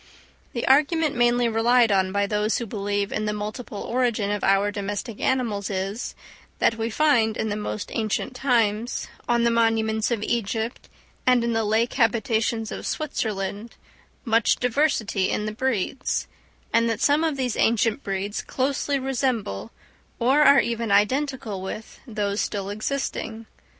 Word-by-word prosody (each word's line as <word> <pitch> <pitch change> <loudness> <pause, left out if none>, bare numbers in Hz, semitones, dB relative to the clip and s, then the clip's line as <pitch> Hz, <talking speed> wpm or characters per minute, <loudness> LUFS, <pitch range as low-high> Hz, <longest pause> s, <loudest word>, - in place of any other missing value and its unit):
The 235 - -2
argument 300 +2 +3
mainly 240 0 +3
relied 230 +1 +3
on 190 -1 +2
by 200 +1 +1
those 210 +1 0
who 235 - -3
believe 205 -1 -2
in 215 - -2
the 210 - -1
multiple 210 +1 -5
origin 235 -5 0
of 205 -1 -2
our 195 +1 +3
domestic 205 +2 -4
animals 230 -6 0
is, 195 +3 -3 0.4
that - - +3
we 225 0 -2
find 230 -5 +2
in 220 - -1
the 205 - -1
most 210 -1 -4
ancient 225 +4 -2
times, 235 -3 0 0.2
on 235 -1 +3
the 235 - +3
monuments 225 -1 +2
of 230 -4 -1
Egypt, 225 +1 -2 0.4
and 250 -2 +5
in 235 0 0
the 225 0 +1
lake 220 +3 +1
habitations 225 -1 +1
of - - -5
Switzerland, 215 -6 -3 0.5
much 230 -1 +3
diversity 240 -6 +1
in 210 - -1
the 215 - -2
breeds; 255 +1 -1 0.5
and 230 0 +3
that 225 - -1
some 295 +2 +3
of 315 -4 0
these 255 -3 -1
ancient 225 +2 +2
breeds 195 0 -3
closely 275 +1 -1
resemble, 255 - -2 0.5
or 265 +5 +3
are 280 -2 +7
even 230 -2 -2
identical 225 -1 +1
with, 200 +3 -7
those 205 -2 -1
still 200 -1 -3
existing. 225 0 -3
225 Hz, 150 wpm, -24 LUFS, 210-250 Hz, 0.5 s, are